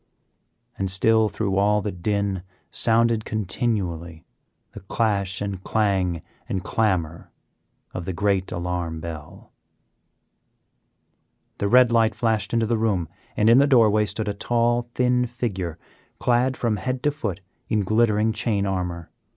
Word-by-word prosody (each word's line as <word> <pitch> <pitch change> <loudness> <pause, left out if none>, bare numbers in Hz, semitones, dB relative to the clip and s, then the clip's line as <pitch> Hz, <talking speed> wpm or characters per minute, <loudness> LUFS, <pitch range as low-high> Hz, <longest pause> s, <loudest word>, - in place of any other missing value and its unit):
And 95 -1 0
still 110 +3 +3
through 100 -3 -2
all 105 +1 +3
the 105 0 -3
din 100 +1 -1 0.3
sounded 115 -1 +2
continually 95 -7 -3 0.5
the - - -9
clash 100 -1 -1
and 100 -2 -4
clang 95 -6 0 0.3
and 95 -1 -2
clamor 90 -6 -1 0.6
of 90 - -5
the 95 - -2
great 95 0 0
alarm 85 -2 -3
bell. 80 -2 -9 2.1
The 100 - 0
red 125 +2 +5
light 115 -2 +3
flashed 110 -2 0
into 115 -1 +2
the 115 0 0
room, 95 -8 0 0.3
and 105 - +3
in 115 +3 +7
the 140 - +5
doorway 110 -5 +4
stood 105 +1 -3
a 105 - -1
tall, 120 +3 0
thin 125 0 +2
figure 95 -9 -4 0.4
clad 125 +2 +1
from 115 -3 0
head 130 +5 -3
to 150 - +3
foot 105 - -4 0.3
in 110 -2 +1
glittering 110 +1 +2
chain 105 -2 0
armor. 90 -3 -3
105 Hz, 135 wpm, -23 LUFS, 95-115 Hz, 2.1 s, in